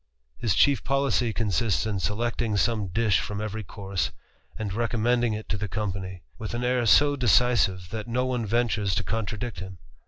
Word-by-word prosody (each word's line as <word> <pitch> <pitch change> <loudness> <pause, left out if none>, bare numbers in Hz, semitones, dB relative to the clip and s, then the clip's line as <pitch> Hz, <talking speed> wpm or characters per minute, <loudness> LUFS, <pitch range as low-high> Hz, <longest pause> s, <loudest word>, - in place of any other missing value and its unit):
His 110 -5 +1
chief 140 -2 +4
policy 135 -4 +1
consists 110 0 0
in 105 -3 -1
selecting 110 +1 -1
some 105 0 +1
dish 105 +1 +2
from 105 - -4
^ery 110 +1 -4
course, 95 -1 -3 0.5
and 105 -3 -3
recommending 120 +1 +1
it 105 0 -5
to 105 - -1
the 105 +1 -3
company, 95 -3 -4 0.2
with 110 +1 -4
I 120 - -2
air 125 -1 +1
so 145 +5 +6
decisive, 105 -6 +2
that 110 0 -5
no 125 +2 0
one 125 -2 -1
ventures 105 -4 +1
to - - 0
contradict 110 -1 -3
him. 95 +1 -8
110 Hz, 175 wpm, -26 LUFS, 100-120 Hz, 0.5 s, so